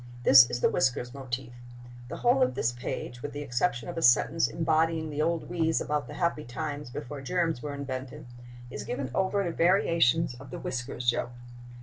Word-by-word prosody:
This 130 Hz, -1 st, +8 dB
is 120 Hz, -, -3 dB
the -, -, +4 dB
whiskers 125 Hz, -1 st, 0 dB
motif. 130 Hz, -2 st, -5 dB, 0.5 s
The -, -, -6 dB
whole 245 Hz, +2 st, +3 dB
of 255 Hz, -, +2 dB
this 115 Hz, -, +1 dB
page, 120 Hz, 0 st, -6 dB
with 145 Hz, -, -6 dB
the 145 Hz, 0 st, -5 dB
exception 125 Hz, -1 st, -1 dB
of -, -, -4 dB
a -, -, -4 dB
sentence 120 Hz, -2 st, +4 dB
embodying 160 Hz, +3 st, 0 dB
the 150 Hz, +1 st, -2 dB
old 165 Hz, +1 st, 0 dB
wheeze 165 Hz, -2 st, +1 dB
about 150 Hz, -1 st, -2 dB
the -, -, -9 dB
happy 170 Hz, -4 st, -1 dB
times 145 Hz, +2 st, -5 dB
before 135 Hz, +3 st, -7 dB
germs 165 Hz, -2 st, -1 dB
were 145 Hz, -1 st, -5 dB
invented, 130 Hz, -2 st, -6 dB, 0.5 s
is -, -, -5 dB
given 130 Hz, -1 st, -4 dB
over 190 Hz, +3 st, +1 dB
to 175 Hz, -, -2 dB
variations 165 Hz, -5 st, +3 dB
of 135 Hz, 0 st, -11 dB
the -, -, -6 dB
whiskers 125 Hz, -1 st, -5 dB
joke. 120 Hz, 0 st, +1 dB
145 Hz, 190 wpm, -28 LUFS, 125-165 Hz, 0.5 s, This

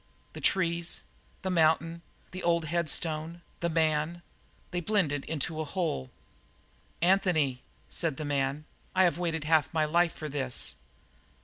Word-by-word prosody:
The -, -, -8 dB
trees, 170 Hz, -2 st, +1 dB, 0.4 s
the 190 Hz, -, -1 dB
mountain, 165 Hz, 0 st, +3 dB, 0.3 s
the 185 Hz, +1 st, -6 dB
old 170 Hz, -1 st, +2 dB
headstone, 165 Hz, 0 st, -1 dB, 0.2 s
the 170 Hz, -, 0 dB
man 160 Hz, +1 st, +1 dB, 0.5 s
they 175 Hz, -, 0 dB
blended 170 Hz, -7 st, +1 dB
into 160 Hz, +1 st, -2 dB
a -, -, 0 dB
whole. 155 Hz, -, -2 dB, 0.9 s
"Anthony!" 170 Hz, -8 st, +3 dB, 0.3 s
said 165 Hz, -5 st, -1 dB
the 155 Hz, -, -4 dB
man, 140 Hz, +1 st, -1 dB, 0.3 s
"I 185 Hz, -, +6 dB
have 175 Hz, -2 st, +2 dB
waited 165 Hz, -3 st, -1 dB
half 155 Hz, -1 st, +3 dB
my 160 Hz, -2 st, +2 dB
life 170 Hz, +2 st, +2 dB
for 155 Hz, -, -5 dB
this!" 135 Hz, -4 st, 0 dB
160 Hz, 135 wpm, -29 LUFS, 150-175 Hz, 0.9 s, I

